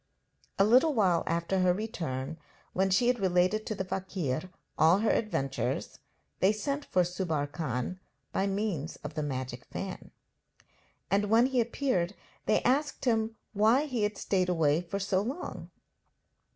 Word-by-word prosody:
A 195 - +5
little 255 +8 +5
while 185 -6 +3
after 170 +3 0
her 180 -1 +3
return, 160 -9 -4 0.3
when 190 +1 +2
she 190 +6 +3
had 245 0 +2
related 185 +3 +2
to 215 - -2
the 190 - -3
fakir 185 -5 -3 0.3
all 165 +4 +5
her 220 +2 +2
adventures, 135 -11 -1 0.4
they 190 - +5
sent 280 +7 -2
for 180 - +2
Subbar 175 -4 -1
Khan 150 +2 -3 0.3
by 195 - 0
means 195 -7 -2
of 150 +1 -6
the 155 - -2
magic 130 -3 -4
fan; 195 -1 -6 1.0
and 200 +1 +2
when 230 +3 +6
he 260 -2 +2
appeared 225 -6 0 0.3
they - - +3
asked 280 +3 +1
him 225 -2 +1 0.2
why 225 +7 +4
he 255 -6 -2
had 210 -1 0
stayed 185 -2 0
away 160 -2 +2
for 180 +3 -4
so 195 -1 +1
long. 265 - -5
190 Hz, 150 wpm, -30 LUFS, 170-220 Hz, 1.0 s, when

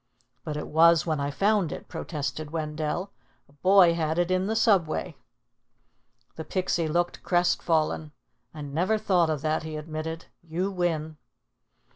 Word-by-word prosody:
"But 150 -1 -4
it 150 - -5
was 165 +1 +5
when 155 -3 -1
I 140 0 -1
found 195 +2 +1
it," - - -7
protested 150 -1 -4
Wendell. 155 +4 -3 0.4
"A 140 - -24
boy 185 +3 +5
had 160 -1 -1
it 175 +1 +1
in 185 +1 +1
the 220 - -1
Subway." 195 -9 +1 1.2
The 160 - -4
Pixie 175 -1 -1
looked 175 +3 -1
crestfallen. 165 -3 +1 0.4
"I 155 - -9
never 165 +10 0
thought 180 -5 +2
of 150 -3 -2
that," 155 0 0
he 155 -1 -6
admitted. 160 +2 -5 0.2
"You 175 +4 -3
win." 160 -4 -2
160 Hz, 145 wpm, -26 LUFS, 155-180 Hz, 1.2 s, was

